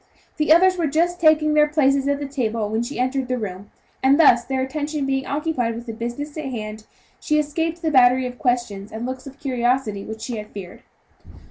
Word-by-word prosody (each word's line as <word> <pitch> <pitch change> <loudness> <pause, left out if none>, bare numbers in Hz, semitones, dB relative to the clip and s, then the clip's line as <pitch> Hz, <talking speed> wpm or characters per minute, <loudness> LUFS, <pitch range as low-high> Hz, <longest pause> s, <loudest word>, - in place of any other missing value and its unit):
The 305 0 +1
others 370 +3 +6
were 330 - +1
just 340 +4 0
taking 310 -1 +4
their 300 0 +5
places 280 -2 +2
at 285 0 +1
the 290 - -4
table 230 -6 -2
when 220 +1 -1
she 240 +5 -5
entered 255 +1 -1
the 255 0 -1
room, 200 -3 -6 0.3
and 275 +3 +4
thus, 245 -7 +6
their 260 +1 -2
attention 290 +2 -3
being 270 0 -1
occupied 280 -6 -1
with 235 +1 -7
the 225 - -6
business 240 +6 -5
in 305 -4 -4
hand, 215 -3 -6 0.3
she 305 - 0
escaped 325 +3 -1
the 320 - +1
battery 255 -1 +5
of 245 0 -6
questions 235 -5 -1
and 225 +2 -5
looks 260 +1 -6
of 275 0 -11
curiosity 245 -5 -1
which 220 +1 -8
she 235 0 -4
had 210 0 -6
feared. 190 -4 -10
265 Hz, 210 wpm, -22 LUFS, 235-300 Hz, 0.3 s, others